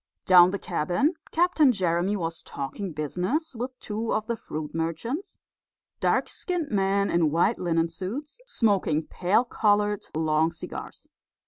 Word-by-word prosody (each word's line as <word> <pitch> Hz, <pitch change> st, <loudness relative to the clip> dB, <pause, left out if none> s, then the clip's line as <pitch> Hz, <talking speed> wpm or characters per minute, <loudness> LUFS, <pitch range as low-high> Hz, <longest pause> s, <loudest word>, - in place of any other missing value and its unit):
Down 180 Hz, -2 st, +8 dB
in -, -, +1 dB
the 200 Hz, -, -2 dB
cabin, 180 Hz, -, 0 dB, 0.2 s
Captain 325 Hz, -5 st, +4 dB
Jeremy 185 Hz, -1 st, 0 dB
was 165 Hz, -2 st, -4 dB
talking 145 Hz, +8 st, -5 dB
business 180 Hz, -, -2 dB
with 250 Hz, +2 st, -5 dB
two 220 Hz, +2 st, -3 dB
of 215 Hz, -, 0 dB
the 235 Hz, -, -2 dB
fruit 155 Hz, -7 st, -6 dB
merchants 165 Hz, -, -3 dB, 0.6 s
dark -, -, +2 dB
skinned 350 Hz, -5 st, -3 dB
men 200 Hz, 0 st, +1 dB
in 170 Hz, -2 st, +3 dB
white 170 Hz, +9 st, +2 dB
linen 165 Hz, -2 st, +1 dB
suits, 220 Hz, -, -6 dB
smoking 200 Hz, -, +1 dB
pale 190 Hz, +10 st, +1 dB
coloured 210 Hz, -3 st, +1 dB
long 160 Hz, 0 st, +2 dB
cigars. -, -, -8 dB
195 Hz, 140 wpm, -26 LUFS, 165-235 Hz, 0.6 s, Down